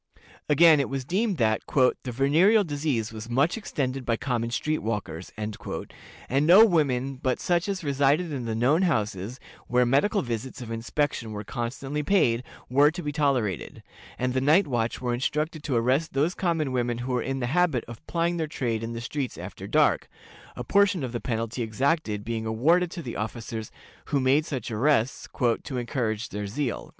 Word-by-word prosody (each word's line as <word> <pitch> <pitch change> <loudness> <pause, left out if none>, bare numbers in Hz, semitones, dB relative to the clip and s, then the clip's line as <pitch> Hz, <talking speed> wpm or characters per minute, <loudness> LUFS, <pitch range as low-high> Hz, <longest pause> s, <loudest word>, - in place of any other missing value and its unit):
Again, 155 +1 +7
it 140 - 0
was 135 -1 -3
deemed 195 - 0
that 110 -3 +2
"the 130 -1 +2
venereal 160 - +4
disease 145 - -2
was 110 +1 -8
much 140 +7 +2
extended 135 - -3
by 115 -2 0
common 120 -3 -1
street 155 +6 -1
walkers," 105 -6 -4
and 105 0 -3 0.9
no 180 +9 +8
women 135 - +1
but 130 -1 0
such 175 +2 0
as 195 -3 -3
resided 145 +3 +1
in 130 -4 -4
the 110 -1 -2
known 135 +9 +3
houses, 110 - -1 0.3
where 125 0 +3
medical 145 - +2
visits 120 +1 -4
of 120 -2 -7
inspection 115 0 -2
were 105 0 -5
constantly 130 +6 -4
paid, 140 -9 +2 0.3
were 140 +4 +5
to 175 +3 -6
be 150 - -2
tolerated, 135 - -1 0.3
and 125 0 -1
the 130 - +1
night 155 +9 +4
watch 120 -4 -1
were 125 -1 -1
instructed 150 +5 -1
to 135 - -1
arrest 130 +7 +1
those 150 +6 +1
common 165 -7 -1
women 120 -2 0
who 130 - -3
were 125 - +1
in 135 +2 -3
the 125 - -1
habit 175 -8 +2
of 120 -1 -10
plying 170 0 0
their 160 -2 -1
trade 115 -6 -2
in 115 +1 -4
the 115 - -5
streets 130 +2 -4
after - - -8
dark - - +2 0.5
a 125 - -5
portion 200 +3 +3
of 125 - -3
the 120 - -4
penalty 115 0 -3
exacted 115 -1 0
being 110 -1 -3
awarded 165 +11 +3
to 170 -1 -7
the 120 - -6
officers 110 0 -5 0.4
who 140 - 0
made 135 +4 +3
such 125 -4 -4
arrests, 125 +2 +1 0.4
"to 130 - -5
encourage 115 -2 -2
their 105 0 -4
zeal." 125 +5 -3
130 Hz, 180 wpm, -26 LUFS, 115-155 Hz, 0.9 s, no